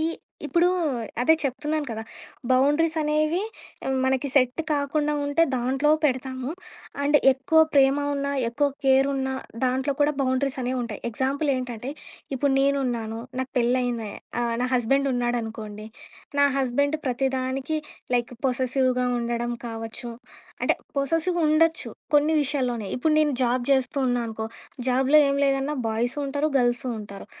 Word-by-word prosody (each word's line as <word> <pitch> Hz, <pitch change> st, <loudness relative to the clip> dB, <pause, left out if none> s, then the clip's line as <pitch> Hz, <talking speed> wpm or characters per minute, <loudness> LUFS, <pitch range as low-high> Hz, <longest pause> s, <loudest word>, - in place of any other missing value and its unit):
ఈ -, -, 0 dB, 0.4 s
ఇప్పుడు 345 Hz, 0 st, +3 dB, 0.5 s
అదే 320 Hz, +6 st, +5 dB
చెప్తున్నాను 295 Hz, +3 st, -2 dB
కదా! 220 Hz, 0 st, -4 dB, 0.5 s
బౌండరీస్ 295 Hz, +6 st, +3 dB
అనేవి 305 Hz, +3 st, +1 dB, 0.6 s
మనకి 265 Hz, +1 st, +1 dB
సెట్ 255 Hz, +2 st, +3 dB
కాకుండా 295 Hz, +1 st, 0 dB
ఉంటే 285 Hz, +3 st, +2 dB
దాంట్లో 265 Hz, +4 st, +1 dB
పెడతాము. 260 Hz, -1 st, -1 dB, 0.5 s
అండ్ 295 Hz, +1 st, +4 dB, 0.2 s
ఎక్కువ 275 Hz, +5 st, +3 dB
ప్రేమ 270 Hz, 0 st, +5 dB, 0.2 s
ఉన్నా, 280 Hz, 0 st, -2 dB, 0.2 s
ఎక్కువ 285 Hz, +5 st, +1 dB, 0.2 s
కేర్ 265 Hz, +1 st, +5 dB
ఉన్నా, 265 Hz, 0 st, -1 dB, 0.3 s
దాంట్లో 260 Hz, +2 st, +1 dB
కూడా 290 Hz, +1 st, +4 dB
బౌండరీస్ 260 Hz, +1 st, 0 dB
అనేవి 255 Hz, +1 st, -1 dB
ఉంటాయి. 220 Hz, -4 st, -6 dB
ఎగ్జాంపుల్ 270 Hz, +6 st, -1 dB
ఏంటంటే, 250 Hz, 0 st, -5 dB, 0.5 s
ఇప్పుడు 280 Hz, +1 st, +1 dB
నేనున్నాను 245 Hz, -5 st, 0 dB, 0.2 s
నాకు 260 Hz, -, -4 dB
పెళ్లయింది, 240 Hz, -3 st, 0 dB, 0.3 s
ఆహ్, 235 Hz, -1 st, 0 dB
నా -, -, +2 dB
హస్బెండ్ 275 Hz, +3 st, +2 dB
ఉన్నాడనుకోండి, 225 Hz, -3 st, -3 dB, 0.5 s
నా -, -, +7 dB
హస్బెండ్ 285 Hz, +4 st, +1 dB
ప్రతి 260 Hz, +2 st, +1 dB
దానికి 265 Hz, +4 st, -2 dB, 0.4 s
లైక్ 240 Hz, 0 st, 0 dB
పొసెసివ్‌గా 255 Hz, 0 st, +1 dB
ఉండడం 240 Hz, 0 st, -2 dB
కావచ్చు, 225 Hz, +1 st, -6 dB, 0.5 s
అంటే, -, -, +3 dB, 0.2 s
పొసెసివ్‌గా 330 Hz, +5 st, 0 dB
ఉండొచ్చు 325 Hz, +1 st, +2 dB, 0.2 s
కొన్ని 295 Hz, +2 st, +4 dB
విషయాల్లోనే. 250 Hz, -6 st, -1 dB
ఇప్పుడు 310 Hz, +4 st, +2 dB
నేను 300 Hz, -2 st, +3 dB
జాబ్ 245 Hz, +1 st, +1 dB
జేస్తూ 265 Hz, +1 st, +1 dB
ఉన్నా 245 Hz, -1 st, +1 dB
అనుకో, 220 Hz, 0 st, -5 dB, 0.4 s
జాబ్‌లో 265 Hz, +4 st, +4 dB
ఏం 275 Hz, -, +1 dB
లేదన్నా 275 Hz, +2 st, 0 dB
బాయ్సు 235 Hz, +5 st, -1 dB
ఉంటారు 285 Hz, +2 st, 0 dB
గర్ల్సు 245 Hz, +1 st, +1 dB
ఉంటారు. 200 Hz, -1 st, -9 dB
265 Hz, 135 wpm, -25 LUFS, 245-285 Hz, 0.6 s, నా